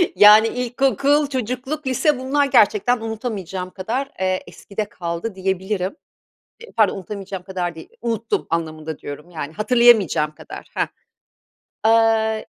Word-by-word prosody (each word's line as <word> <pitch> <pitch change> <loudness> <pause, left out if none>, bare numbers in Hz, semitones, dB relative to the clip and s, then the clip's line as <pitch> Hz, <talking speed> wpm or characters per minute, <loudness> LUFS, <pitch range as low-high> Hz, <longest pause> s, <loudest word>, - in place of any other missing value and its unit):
yani 210 +2 +8
ilkokul, 270 +4 +1
çocukluk, 260 +3 -3
lise 265 +2 +2
bunlar 280 +2 +1
gerçekten 225 -1 +3
unutamayacağım 210 -5 -4
kadar, 235 +9 -3
eee, 185 0 0
eskide 210 +1 -5
kaldı 170 +4 -4
diyebilirim. 190 - -2 0.7
E 470 - -12
pardon 215 -3 +2
unutamayacağım 195 -1 -6
kadar 180 -2 -3
değil. 160 - -11
Unuttum 230 -1 -1
anlamında 160 -2 -3
diyorum 150 +4 -9
yani 155 -3 -6
hatırlayamayacağım 210 -8 +4
kadar, - - -10
hah. - - +1 1.0
Eee 220 -1 +3
215 Hz, 120 wpm, -21 LUFS, 185-245 Hz, 1.0 s, yani